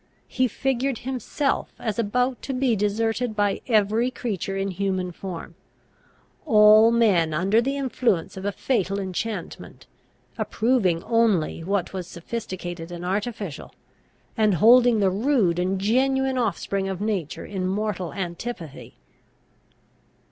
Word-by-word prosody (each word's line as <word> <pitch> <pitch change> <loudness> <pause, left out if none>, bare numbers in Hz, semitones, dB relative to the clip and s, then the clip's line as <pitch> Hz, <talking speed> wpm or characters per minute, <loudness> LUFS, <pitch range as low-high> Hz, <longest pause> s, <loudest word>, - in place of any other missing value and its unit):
He 255 0 +1
figured 265 +2 -1
himself 265 +2 -2
as 220 0 -3
about 250 +4 0
to 270 - -4
be 255 -3 +2
deserted 220 +3 -1
by 205 -1 0
every 220 +1 +2
creature 200 -6 -4
in 195 0 -1
human 185 -1 -2
form; 180 -1 -7 0.9
all 215 -3 +7
men, 195 -9 +3
under 195 +7 +3
the 275 +3 -2
influence 245 -10 0
of 190 - -7
a 205 - -1
fatal 200 -3 -1
enchantment, 200 +3 -5 0.5
approving 215 -8 +1
only 215 -9 +1
what 195 +1 -1
was 185 -2 -5
sophisticated 175 -3 -6
and 175 0 -6
artificial, 200 -3 -4 0.6
and 215 -4 +3
holding 235 +2 +6
the 190 -2 +3
rude 205 -5 +1
and 185 +2 0
genuine 265 +5 +1
offspring 195 -3 -1
of 190 -2 -4
nature 200 -7 -3
in 185 -2 -3
mortal 190 -3 -2
antipathy. 175 - -6
205 Hz, 125 wpm, -24 LUFS, 185-235 Hz, 0.9 s, all